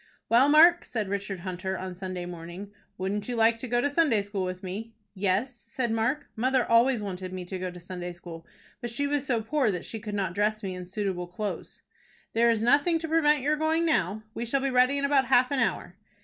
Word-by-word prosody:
"Well, 245 +5 +5
Mark," 335 +3 +7
said 220 -5 -3
Richard 200 -2 -3
Hunter, 185 +1 -4
on 185 0 -5
Sunday 185 -1 -5
morning, 175 +3 -8 0.3
"wouldn't 195 +3 -3
you 245 - -2
like 225 0 +3
to 255 - -5
go 240 0 +1
to 285 - +2
Sunday 285 -8 +2
school 200 -1 -3
with 185 0 -5
me?" 215 +5 -6 0.2
"Yes," 205 +5 -1
said 240 0 -2
Mark. 230 +7 0
"Mother 255 +2 +1
always 230 0 +3
wanted 185 -2 -5
me 185 -1 -6
to 185 +1 -5
go 185 0 -3
to 180 0 -10
Sunday 180 0 -6
school, 170 -1 -10 0.4
but 240 - -4
she 235 +5 -2
was 285 -1 -1
so 235 -5 0
poor 270 0 +1
that 180 -4 -3
she 225 - -6
could 210 -1 -5
not 190 -3 -1
dress 210 +2 0
me 190 -1 -3
in 180 -1 -7
suitable 185 -2 -3
clothes." 200 +4 -6 0.5
"There 235 +1 +4
is 225 -1 +1
nothing 290 +7 +4
to 325 0 -5
prevent 300 -3 +3
your 300 +2 +1
going 320 +2 +1
now. 210 - 0
We 230 - -4
shall 265 +4 0
be 275 0 0
ready 255 +2 +4
in 280 - 0
about 275 -2 +3
half 250 +2 +4
an 280 - +1
hour." 230 -6 -1
220 Hz, 225 wpm, -27 LUFS, 185-265 Hz, 0.5 s, Mark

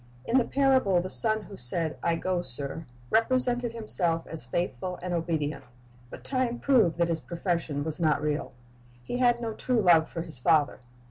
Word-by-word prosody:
In 255 +3 +3
the 240 - 0
parable 260 -9 +2
the 185 +2 -4
son 220 -1 +1
who 200 -1 -11
said, 160 +6 +2
'T 170 - +1
go, 180 +1 -1
sir," 140 +2 0 0.3
represented 245 +1 +2
himself 175 -7 0
as 155 -7 -3
faithful 175 +4 -3
and 180 -1 -3
obedient; 160 -4 -2 0.5
but - - -11
time 255 -3 -1
proved 235 - +2
that 170 -1 +2
his 165 -1 -1
profession 165 0 -3
was 155 +1 -5
not 155 -3 +2
real. 150 0 -2 0.5
He 245 - -4
had 240 -1 +3
no 230 -2 -4
true 250 +2 -1
love 170 -5 +4
for 165 - -5
his 155 -7 -9
father. 145 +1 +2
175 Hz, 180 wpm, -27 LUFS, 160-230 Hz, 0.5 s, love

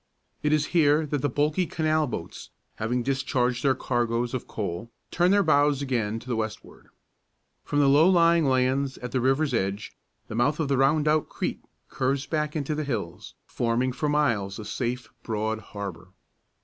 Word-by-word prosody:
It 150 - +1
is 155 -1 +2
here 155 -2 +4
that 145 -2 -2
the 145 - +1
bulky 150 +6 +1
canal 155 -1 +1
boats, - - -7 0.3
having 120 +3 -1
discharged 130 -2 0
their 135 -2 +3
cargoes 120 -1 -1
of 130 - -4
coal, 100 +1 -4 0.2
turn 175 +1 +3
their 200 +1 +4
bows 145 -3 +3
again 115 -5 -1
to 125 - -15
the 125 - -1
westward. 110 -1 -6 0.8
From 145 - -3
the 145 -1 +4
low 150 +6 +6
lying 170 -3 +4
lands 130 +1 +1
at 125 -1 -7
the 130 - 0
river's 135 +2 +1
edge 100 -2 -2 0.3
the - - -7
mouth 130 +7 +1
of 145 -3 -1
Rondout 150 +3 +2
Creek - - -3 0.3
curves 135 +1 -1
back 150 -1 -2
into 150 0 -1
the 155 +1 -2
hills, 110 - -5
forming 120 +2 0
for 140 +4 -2
miles 115 -10 +1
a 110 - -7
safe, 120 +3 -3
broad 110 -1 -2
harbor. 95 -5 -7
130 Hz, 170 wpm, -26 LUFS, 115-150 Hz, 0.8 s, low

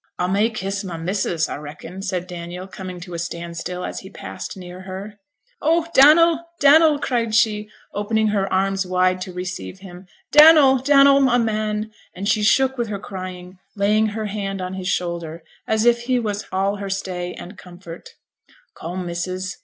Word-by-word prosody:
'A 180 - 0
may 205 +4 +2
kiss 195 -2 -4
my 180 -4 -6
missus, 170 -2 -1
a - - -6
reckon,' 155 +5 -9
said 185 -3 -3
Daniel, 175 0 -7
coming 185 -2 -8
to 180 0 -9
a 170 - -4
standstill 170 +1 -5
as - - -5
he 190 - -11
passed 195 - -8
near 180 0 -9
her. 195 +2 -8 0.4
'Oh, 330 +1 +2
Dannel, 320 +4 +6 0.2
Dannel!' 300 +1 +6
cried 230 -5 -1
she, 215 -2 +2 0.2
opening 215 +1 0
her 200 -2 -1
arms 195 +1 +1
wide 185 0 +1
to 185 - -5
receive 180 +1 -6
him. 185 -1 -12 0.2
'Dannel, 300 -3 +8
Dannel, 275 0 +6
my 260 -2 +4
man!' 215 -1 -1 0.2
and 195 +2 -4
she 215 0 +2
shook 265 +4 +3
with 235 - 0
her 210 -1 -4
crying, 185 -2 -8 0.2
laying 210 +2 +2
her 215 +1 -4
head 195 -1 -4
on 185 0 -4
his 190 -1 -5
shoulder, 170 -3 -3 0.2
as 220 +1 +1
if 235 0 +4
he 250 +1 0
was 210 -3 -3
all 195 +2 0
her 200 0 -5
stay 185 -2 -4
and 185 +4 -10
comfort. 175 -2 -11 0.7
'Come, 180 +2 -5
missus! 185 +2 -4
195 Hz, 175 wpm, -21 LUFS, 180-220 Hz, 0.7 s, Dannel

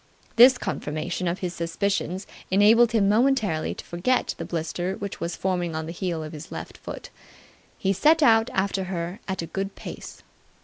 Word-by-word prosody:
This 250 +2 +8
confirmation 165 -1 -3
of 170 +2 -2
his 180 -2 -2
suspicions 185 +2 -2 0.2
enabled 220 +4 +5
him 215 -4 +3
momentarily 215 -7 +2
to - - -9
forget 185 +9 0
the - - -4
blister 175 +3 -3
which 200 -1 -6
was 170 - -3
forming 175 -3 -1
on 160 0 -3
the 165 - -5
heel 170 -2 -3
of 155 - -8
his 155 +1 -9
left - - -7
foot. - - -8 0.7
He 195 0 +1
set 310 - +4
out 225 -4 +5
after 190 0 0
her 180 +2 -4
at 190 -3 -2
a - - -3
good 195 +3 -4
pace. - - -9
190 Hz, 175 wpm, -25 LUFS, 170-210 Hz, 0.7 s, This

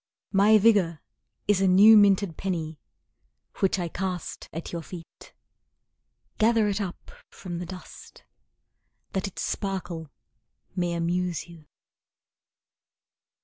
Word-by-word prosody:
My 205 +2 +5
vigour 200 -7 +3 0.5
is 205 -2 +3
a 195 - +3
new 200 +4 +8
minted 200 -4 +4
penny, 165 -5 -4 0.8
Which 195 0 +2
I 175 -2 -2
cast 180 +1 -5
at 165 +2 -6
your 170 - -4
feet. 165 0 -12 1.1
Gather 225 -1 +3
it 205 0 -1
up 185 -3 -7 0.2
from 175 -3 -7
the 175 - -6
dust, 185 0 -12 0.9
That 190 +1 -2
its 195 - -6
sparkle 180 -5 -4 0.7
may 175 -2 -1
amuse 170 0 -2
you. 170 -3 -15
185 Hz, 110 wpm, -26 LUFS, 170-200 Hz, 1.1 s, new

